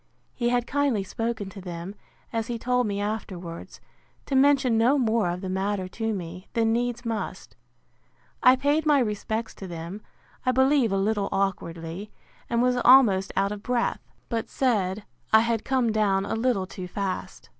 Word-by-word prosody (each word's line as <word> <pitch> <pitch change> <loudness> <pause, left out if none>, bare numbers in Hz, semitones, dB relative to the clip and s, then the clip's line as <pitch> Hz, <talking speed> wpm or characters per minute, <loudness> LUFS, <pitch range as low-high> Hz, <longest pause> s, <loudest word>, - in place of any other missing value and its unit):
He 240 -1 0
had 245 -1 +1
kindly 275 -7 +1
spoken 225 +1 -3
to 195 - -9
them, 175 +1 -6 0.4
as 225 -1 -1
he 240 - -3
told 250 0 +1
me 200 -1 -2
afterwards, 190 -5 -5 0.5
to - - -5
mention 265 -3 +4
no 240 +6 +4
more 225 -6 +2
of 175 +1 -3
the 190 - -4
matter 190 0 -1
to 225 +3 -2
me, 180 -2 -6
than 225 -1 +2
needs 240 +1 -1
must. 225 -2 -4 0.9
I 255 +1 +7
paid 290 +4 +1
my 295 -1 +5
respects 220 -1 -2
to 195 - -9
them, 170 +4 -7 0.4
I 255 - +2
believe 265 -3 +3
a 195 - +1
little 200 0 0
awkwardly, 180 -1 -3 0.4
and 235 +1 +2
was 250 0 +2
almost 240 -7 +6
out 195 +1 +1
of 210 -1 -5
breath: 245 +1 -1 0.3
but 230 -2 -3
said, 210 -6 0 0.3
I 220 - +7
had 230 -1 0
come 255 -4 +1
down 200 -3 +2
a - - -3
little 225 -4 +1
too 185 -1 -7
fast. 195 +1 -4
220 Hz, 170 wpm, -26 LUFS, 195-245 Hz, 0.9 s, I